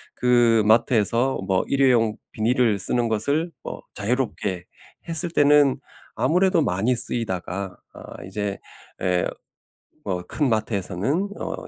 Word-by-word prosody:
그 120 Hz, -2 st, +3 dB
마트에서 115 Hz, +3 st, +2 dB
뭐 95 Hz, -2 st, +1 dB
1 140 Hz, -, 0 dB
회용 115 Hz, -5 st, +3 dB, 0.2 s
비닐을 115 Hz, -1 st, +1 dB
쓰는 120 Hz, +4 st, +1 dB
것을 140 Hz, +10 st, 0 dB
뭐 -, -, -7 dB
자유롭게 105 Hz, -5 st, -2 dB, 0.4 s
했을 165 Hz, +1 st, +3 dB
때는 145 Hz, -3 st, +4 dB, 0.4 s
아무래도 175 Hz, +6 st, +2 dB
많이 110 Hz, +6 st, +1 dB
쓰이다가 100 Hz, -5 st, -2 dB, 0.2 s
아 -, -, -11 dB
이제 105 Hz, -2 st, -4 dB, 0.4 s
예 90 Hz, -1 st, +1 dB, 0.8 s
뭐 90 Hz, -2 st, -3 dB
큰 150 Hz, -, -1 dB
마트에서는 110 Hz, -, -1 dB
어 -, -, -4 dB
115 Hz, 235 characters per minute, -23 LUFS, 100-135 Hz, 0.8 s, 때는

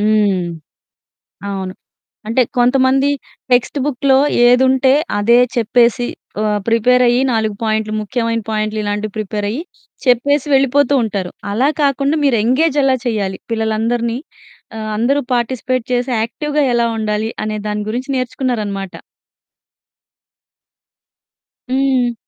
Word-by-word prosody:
హ్మ్. 205 Hz, -4 st, +2 dB, 1.0 s
అవును. 190 Hz, -1 st, -4 dB, 0.5 s
అంటే 230 Hz, +4 st, +2 dB, 0.2 s
కొంతమంది 260 Hz, +2 st, +3 dB, 0.4 s
టెక్స్ట్ 245 Hz, +4 st, +2 dB
బుక్‌లో 270 Hz, -1 st, +2 dB, 0.3 s
ఏదుంటే, 260 Hz, +1 st, +4 dB, 0.3 s
అదే 235 Hz, +4 st, +4 dB, 0.2 s
చెప్పేసి 235 Hz, +1 st, +2 dB, 0.3 s
ఆహ్, 210 Hz, -1 st, 0 dB
ప్రిపేరయ్యి, 245 Hz, +2 st, +3 dB
4 220 Hz, -2 st, 0 dB
పాయింట్లు, 215 Hz, -1 st, -1 dB
ముఖ్యమైన 230 Hz, +1 st, -2 dB
పాయింట్లు 215 Hz, 0 st, -1 dB
ఇలాంటివి 205 Hz, 0 st, -3 dB
ప్రిపేరయ్యి, 210 Hz, +4 st, -3 dB, 0.4 s
చెప్పేసి 270 Hz, +4 st, +2 dB
వెళ్ళిపోతూ 275 Hz, +1 st, +3 dB
ఉంటారు. 195 Hz, -4 st, -3 dB, 0.2 s
అలా 255 Hz, +7 st, +2 dB
కాకుండా, 280 Hz, +1 st, +1 dB
మీరు 255 Hz, -5 st, +3 dB
ఎంగేజ్ 280 Hz, +5 st, +2 dB
ఎలా 265 Hz, -1 st, +3 dB
చేయాలి, 205 Hz, -5 st, -2 dB
పిల్లలందరినీ 230 Hz, +2 st, -1 dB, 0.6 s
ఆహ్, 215 Hz, 0 st, -4 dB
అందరూ 260 Hz, +6 st, +2 dB
పార్టిసిపేట్ 250 Hz, 0 st, -1 dB
చేసి 245 Hz, +1 st, 0 dB
యాక్టివ్‌గా 295 Hz, +6 st, -1 dB
ఎలా 235 Hz, 0 st, +2 dB
ఉండాలి, 215 Hz, 0 st, -1 dB, 0.2 s
అనే 215 Hz, 0 st, -3 dB
దాని 210 Hz, 0 st, -2 dB
గురించి 250 Hz, +5 st, -4 dB
నేర్చుకున్నారనమాట. 215 Hz, -7 st, -3 dB, 2.8 s
హ్మ్. 260 Hz, -2 st, +1 dB
235 Hz, 105 wpm, -17 LUFS, 215-260 Hz, 2.8 s, ఏదుంటే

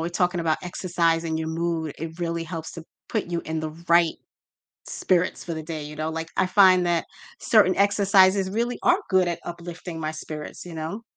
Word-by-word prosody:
we're 165 Hz, -, -1 dB
talking 175 Hz, 0 st, 0 dB
about 160 Hz, -2 st, +1 dB
exercising 170 Hz, -2 st, 0 dB
your 160 Hz, 0 st, -3 dB
mood, 165 Hz, -2 st, -2 dB
it 160 Hz, +2 st, -6 dB
really 170 Hz, -1 st, -2 dB
helps 165 Hz, -1 st, -6 dB
to 165 Hz, -, -8 dB, 0.3 s
put 215 Hz, -5 st, -1 dB
you 170 Hz, -1 st, -2 dB
in 160 Hz, 0 st, -3 dB
the 155 Hz, -1 st, -4 dB, 0.2 s
right 170 Hz, -1 st, +5 dB, 0.7 s
spirits 180 Hz, -1 st, 0 dB
for 170 Hz, -, -4 dB
the 160 Hz, -, -5 dB
day, 155 Hz, -1 st, -5 dB
you 150 Hz, 0 st, -9 dB
know, 155 Hz, +1 st, -2 dB
like, 165 Hz, 0 st, -4 dB
I -, -, +3 dB
find 185 Hz, -2 st, +5 dB
that 170 Hz, -1 st, +1 dB, 0.3 s
certain 205 Hz, -5 st, +4 dB
exercises 195 Hz, -1 st, +4 dB
really 235 Hz, +4 st, -1 dB
are 355 Hz, +3 st, +4 dB
good 185 Hz, -2 st, +3 dB
at 170 Hz, -, -3 dB
uplifting 170 Hz, -1 st, -7 dB
my 155 Hz, 0 st, -2 dB
spirits, 155 Hz, -1 st, -8 dB
you 170 Hz, -, -8 dB
know? 160 Hz, +8 st, -5 dB
170 Hz, 195 wpm, -24 LUFS, 160-185 Hz, 0.7 s, right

